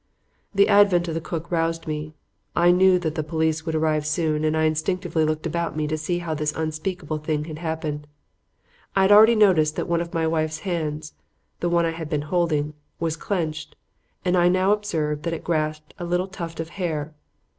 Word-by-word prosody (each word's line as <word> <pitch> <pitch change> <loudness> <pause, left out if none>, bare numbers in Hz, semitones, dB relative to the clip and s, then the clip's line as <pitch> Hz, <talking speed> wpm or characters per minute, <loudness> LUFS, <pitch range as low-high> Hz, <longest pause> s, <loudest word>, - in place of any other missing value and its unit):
"The 200 +1 +5
advent 200 -4 +5
of - - -2
the 165 - -2
cook 165 +1 -5
roused 165 -1 0
me. 155 0 -4 0.4
I 175 +1 +5
knew 185 +1 +5
that 160 -4 -2
the 160 - -1
police 160 +1 -1
would 160 - -1
arrive 155 -1 +1
soon 155 -1 0
and 155 0 +1
I 160 - +2
instinctively 160 +2 0
looked 155 +1 -2
about 165 0 -2
me 155 - 0
to 155 +1 -1
see 155 +3 -2
how 170 -2 -3
this 150 0 -1
unspeakable 155 0 -3
thing 150 -1 -2
had 155 -1 -7
happened. 155 -3 -4 0.9
I 195 - +4
had 190 - +4
already 220 +3 +8
noticed 170 -8 +4
that - - -2
one 170 0 +1
of 170 0 -5
my 165 -1 0
wife's 155 -1 -1
hands 155 -5 -3 0.5
the 175 - 0
one 170 0 +3
that 165 - +1
I 165 - -6
had 160 - -4
not 150 - -1
been - - -2
holding 155 -4 +1 0.3
was 165 -1 -1
clenched, 160 -3 -3 0.5
and 180 0 +2
I 175 -1 +4
now 185 +2 +3
observed 160 -8 -1
that 170 +2 -2
it - - -8
grasped 155 -2 -2
a 175 - -4
little 180 +2 0
tuft 170 -4 -7
of 165 0 -4
hair. 160 -5 -3
160 Hz, 210 wpm, -24 LUFS, 155-175 Hz, 0.9 s, already